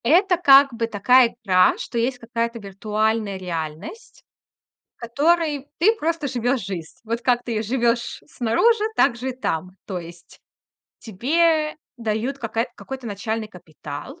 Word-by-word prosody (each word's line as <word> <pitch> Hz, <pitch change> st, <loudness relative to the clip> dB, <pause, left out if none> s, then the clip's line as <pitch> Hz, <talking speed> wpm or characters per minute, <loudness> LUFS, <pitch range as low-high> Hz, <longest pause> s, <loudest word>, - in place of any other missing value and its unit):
Это 360 Hz, -, +4 dB
как 275 Hz, -5 st, +6 dB
бы 230 Hz, 0 st, -2 dB
такая 235 Hz, +3 st, +4 dB
игра, 185 Hz, -3 st, +4 dB
что 235 Hz, -, -4 dB
есть 250 Hz, +2 st, 0 dB
какая-то 235 Hz, 0 st, -3 dB
виртуальная 210 Hz, +1 st, -1 dB
реальность, 170 Hz, -, -7 dB, 0.7 s
в -, -, -38 dB
которой 290 Hz, +4 st, +1 dB
ты 425 Hz, +7 st, +4 dB
просто 330 Hz, -5 st, -1 dB
живёшь 245 Hz, +1 st, 0 dB
жизнь. 175 Hz, -5 st, -6 dB
Вот 230 Hz, +1 st, -3 dB
как 245 Hz, -1 st, +2 dB
ты 225 Hz, -3 st, -2 dB
живёшь 235 Hz, +1 st, -1 dB
снаружи, 415 Hz, -, +2 dB
так 235 Hz, -, +3 dB
же 255 Hz, +3 st, -3 dB
и -, -, -4 dB
там. 185 Hz, -9 st, -3 dB, 0.2 s
То 190 Hz, -3 st, -4 dB
есть 170 Hz, 0 st, -13 dB, 0.6 s
тебе 305 Hz, -, +1 dB, 0.2 s
дают 230 Hz, +4 st, -2 dB
какая 230 Hz, -1 st, -2 dB
какой-то 265 Hz, -2 st, -8 dB
начальный 220 Hz, +1 st, -3 dB
капитал, 165 Hz, -, -10 dB
235 Hz, 140 wpm, -22 LUFS, 210-275 Hz, 0.7 s, как